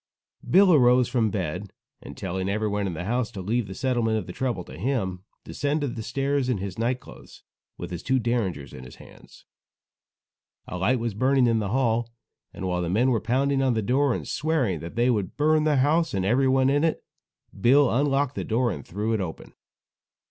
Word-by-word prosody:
Bill 185 +1 +6
arose 125 -3 +5
from 115 -4 +1
bed, 95 0 -4 0.3
and - - -11
telling 95 +1 -3
everyone 105 -1 -1
in 90 - -4
the 85 - -5
house 115 +4 -1
to 100 - -7
leave 110 +4 -1
the 95 - -8
settlement 120 -3 0
of 105 - -3
the 90 - -8
trouble 120 -7 -2
to - - -12
him, 95 - -2 0.2
descended 145 -2 -2
the 115 - -5
stairs 135 +3 -1
in 125 - +1
his 95 +1 -6
night 120 +2 0
clothes, - - -15 0.3
with - - -7
his 85 -1 -5
two 130 0 +1
derringers 110 - -2
in 65 - -9
his 65 - -12
hands. - - -17 1.2
A 90 - -5
light 120 +8 +2
was 115 -2 -3
burning 130 +4 +3
in 115 -2 +2
the 105 -2 -2
hall, 120 -1 +1 0.4
and 95 - -5
while 90 -1 -1
the 85 - -2
men 120 +8 +2
were 115 - +1
pounding 135 +3 +1
on 130 -3 +2
the 110 - 0
door, 130 +3 +2
and - - -6
swearing 140 - 0
that 85 +2 -8
they 120 +2 +3
would 100 -6 -2
burn 155 +1 +3
the 155 -1 +3
house 155 +2 +2
and 95 -1 -1
everyone 130 +4 +3
in 145 +2 +2
it, 165 - 0 0.6
Bill 135 +4 +5
unlocked 140 +1 +1
the - - -4
door 120 +1 0
and 70 - -6
threw 105 +5 -3
it 110 - 0
open. 85 -4 -7
120 Hz, 205 wpm, -25 LUFS, 100-135 Hz, 1.2 s, Bill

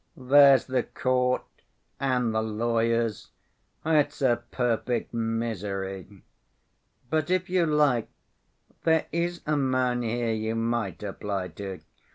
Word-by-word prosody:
"There's 135 0 +6
the 130 -1 0
court, 125 +1 0 0.6
and 125 -4 +1
the 110 - +1
lawyers—it's 115 +7 -1
a 120 -2 +3
perfect 120 -1 -1
misery. 100 -4 -3 0.9
But 155 -1 0
if 185 -1 0
you 180 -3 +3
like, 145 -6 +2 0.7
there 160 -1 +3
is 170 +1 -2
a 150 - +1
man 130 -2 +1
here 115 0 -1
you 110 +1 -2
might 115 -5 -2
apply 100 -2 -4
to." 95 -2 -7
120 Hz, 110 wpm, -27 LUFS, 110-140 Hz, 0.9 s, There's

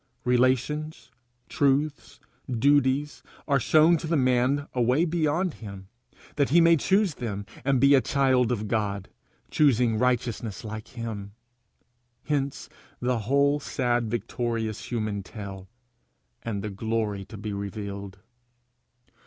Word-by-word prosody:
Relations, 130 +3 0 0.4
truths, 140 +1 0 0.3
duties, 140 +3 +2 0.3
are 140 -2 +3
shown 160 +6 +5
to 160 - -6
the 165 0 +1
man 130 +2 +2
away 125 +6 +2
beyond 165 +1 0
him, 100 -3 -10 0.5
that 140 -2 +2
he 165 +5 +5
may 170 0 +6
choose 190 +3 +2
them, 100 -7 -5 0.2
and 135 -1 +2
be 140 +2 +6
a 135 - +6
child 130 -1 +2
of 110 -3 -2
God, 100 -3 -2 0.4
choosing 125 -6 +3
righteousness 120 -4 -1
like 110 0 -7
him. 110 -4 -6 0.9
Hence 140 -2 -2 0.3
the 125 -1 0
whole 140 +1 +3
sad 120 -5 -1
victorious 115 -1 -3
human 110 -4 -2
tale, 95 -1 -9 0.7
and 105 -4 -4
the 105 - -4
glory 105 -1 -2
to 105 +3 -10
be 105 0 -5
revealed! 100 -1 -6
125 Hz, 120 wpm, -26 LUFS, 110-140 Hz, 0.9 s, may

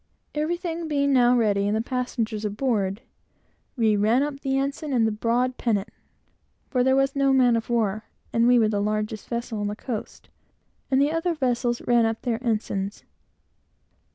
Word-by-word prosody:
Everything 335 +2 -2
being 280 -2 +1
now 245 -1 +5
ready, 205 -3 +2
and 210 +1 +1
the - - 0
passengers 235 -3 -3
aboard, 210 -2 -1 0.7
we 220 -3 +3
ran 220 +6 +3
up 290 -1 -4
the 270 -1 -1
ensign 280 +2 -2
and 220 -3 +1
broad 245 +3 +1
pennant, 220 -3 0 0.8
(for 250 -3 +2
there 265 +1 +3
was 270 +1 +1
no 275 -1 +3
man 250 -3 +4
of 230 +1 -3
war, 215 -3 0 0.3
and 230 +1 +3
we 245 0 +6
were 225 -2 +4
the 205 -1 0
largest 215 0 -2
vessel 235 -2 -3
on 205 - -1
the 205 - -3
coast,) 225 -1 -6 0.6
and 265 - +3
the 285 +2 +3
other 330 +1 -1
vessels 245 -4 0
ran 235 -2 +3
up 225 0 -4
their 230 -2 -1
ensigns. 205 -4 -2
240 Hz, 170 wpm, -25 LUFS, 215-270 Hz, 0.8 s, we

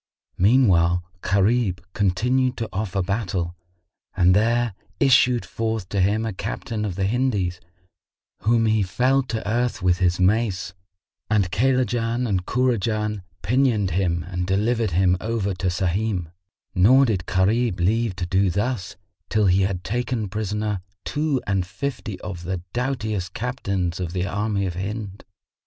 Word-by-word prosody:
Meanwhile 90 -6 +4 0.2
Gharib 100 0 +2
continued 125 +7 +1
to 115 - -2
offer 100 -1 -1
battle 90 -4 -2 0.6
and 90 0 +5
there 115 +1 +2 0.3
issued 125 -3 +4
forth 110 -4 -3
to 100 - 0
him 105 +4 +2
a 110 - -3
captain 105 +2 -4
of 95 -4 -3
the 95 - -1
Hindís 100 -5 0 0.8
whom 115 +1 +2
he 110 -1 +3
felled 125 +8 +1
to 110 -2 -3
earth 120 -2 0
with 90 0 +3
his 90 -1 +2
mace, 95 -2 +1 0.6
and 100 -4 +2
Kaylajan 120 +1 +1
and 95 -4 -1
Kurajan 110 -4 0 0.2
pinioned 115 -5 +2
him 85 -1 0
and 90 -1 -4
delivered 110 +4 +1
him 90 +1 +2
over 110 -3 -1
to 90 +1 -2
Sahim; 90 0 -1 0.4
nor 120 +8 +6
did 95 -7 -1
Gharib 105 +2 +1
leave 110 +3 +1
to 90 -1 -3
do 95 +2 +2
thus, 100 -1 -2 0.3
till 110 -1 +2
he 95 +1 +4
had 95 -2 -1
taken 120 -1 -2
prisoner 105 -1 -2 0.2
two 150 -2 0
and 95 -1 +1
fifty 110 0 -5
of 90 -1 -6
the 90 0 -3
doughtiest 110 -7 -2
Captains 100 -8 -2
of 90 -2 -3
the 90 -1 -1
army 100 0 -1
of 90 - -2
Hind. 100 +2 -5
105 Hz, 145 wpm, -23 LUFS, 90-115 Hz, 0.8 s, nor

